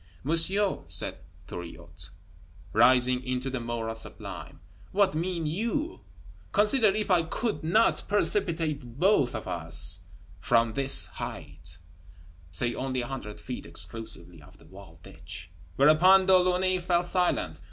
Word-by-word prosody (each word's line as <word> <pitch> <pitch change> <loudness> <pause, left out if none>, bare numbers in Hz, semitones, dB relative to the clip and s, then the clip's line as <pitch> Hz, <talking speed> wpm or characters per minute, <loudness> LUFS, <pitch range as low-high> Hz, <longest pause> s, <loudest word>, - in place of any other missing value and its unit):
"Monsieur," 185 +7 +2
said - - -2 0.3
Thuriot, 85 -1 -8 0.6
rising 125 +2 +4
into 130 +1 -3
the 130 - -3
moral 115 -1 -4
sublime, 115 -7 -8 0.3
"what 200 -3 +2
mean 170 +1 -3
you? 235 - -3 0.5
Consider 215 +3 +5
if 205 0 0
I 175 -2 +4
could 210 +6 -3
not 215 +9 +2
precipitate 165 - +1
both 175 -9 +2
of - - -6
us - - +2 0.4
from 115 -1 +1
this 135 +1 +4
height," 80 +2 -8 0.7
say 120 +7 0
only 130 -1 -3
a 120 - -5
hundred 120 -6 -7
feet, 125 -2 -8
exclusive 110 -6 -3
of 70 - -18
the - - -19
walled 95 -4 -15
ditch! - - -10 0.2
Whereupon 175 - +5
De 190 0 +5
Launay 185 0 +2
fell 175 0 0
silent. 180 0 -1
150 Hz, 130 wpm, -27 LUFS, 115-185 Hz, 0.7 s, Consider